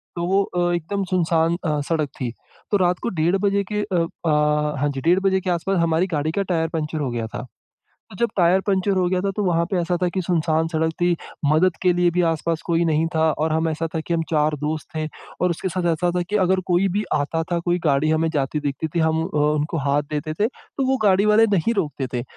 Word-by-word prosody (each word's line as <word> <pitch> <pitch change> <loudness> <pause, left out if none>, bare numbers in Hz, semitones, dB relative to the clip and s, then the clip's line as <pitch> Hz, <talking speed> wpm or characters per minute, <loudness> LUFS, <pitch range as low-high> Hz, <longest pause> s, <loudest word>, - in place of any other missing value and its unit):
तो 170 0 -2
वो 195 +2 +3
अ, 175 -1 -1
एकदम 185 +4 -2
सुनसान 170 -2 +2
अ, 150 -1 0
सड़क 155 -4 0
थी, 120 -2 -1 0.4
तो 205 - +4
रात 180 -1 +1
को - - 0
डेढ़ 175 +4 +3
बजे 200 0 +2
के 210 0 0
अ 185 -5 0 0.2
अ, 160 - +3 0.5
हाँ 145 +1 +1
जी 135 -1 -4
डेढ़ 175 +5 +3
बजे 190 -1 +2
के 185 - -3
आस-पास 180 +2 0
हमारी 170 +2 +2
गाड़ी 155 +2 -1
का 200 - -1
टायर 165 -3 0
पंक्चर 155 0 -2
हो 135 -3 -1
गया 115 -2 -3
था। 125 +3 -7 0.6
तो 190 - -11
जब 235 - +1
टायर 180 +1 +4
पंक्चर 195 0 +1
हो 180 -1 +2
गया 185 0 0
था 195 +1 -1
तो 210 - 0
वहाँ 170 -2 +2
पे 190 - 0
ऐसा 175 +1 0
था 180 - +3
कि 190 - 0
सुनसान 165 -2 +1
सड़क 160 0 0
थी, 175 -1 +2 0.4
मदद 170 +2 +3
के 180 -1 +4
लिए 175 0 +2
भी 180 +1 +1
आस-पास 165 0 0
कोई 170 0 +2
नहीं 160 0 +2
था 160 - +2 0.2
और 155 +1 0
हम 160 +1 +1
ऐसा 160 +1 -2
था 160 - 0
कि 170 +1 -2
हम 165 - +1
4 150 -1 +2
दोस्त 155 +1 -3
थे 155 0 -1 0.3
और 180 0 +2
उसके 170 +3 -2
साथ 180 -1 -2
ऐसा 175 +2 0
था 175 - +1
कि 210 - +2
अगर 185 +1 +2
कोई 180 +2 +2
भी 205 +4 -1
आता 155 +3 0
था, 170 - +2
कोई 175 +1 0
गाड़ी 150 +1 +2
हमें 160 +1 +2
जाती 145 +1 0
दिखती 145 +2 -3
थी - - +1
हम 160 0 +2
अ, - - -5
उनको 150 +2 +1
हाथ 145 +1 +2
देते 155 +1 -3
थे, 210 +6 +1
तो 270 0 -6
वो 265 0 +2
गाड़ी 200 +1 +4
वाले 220 +2 +5
नहीं 230 +8 +1
रोकते 145 -6 -1
थे। 120 - -1
170 Hz, 250 wpm, -22 LUFS, 155-185 Hz, 0.6 s, वाले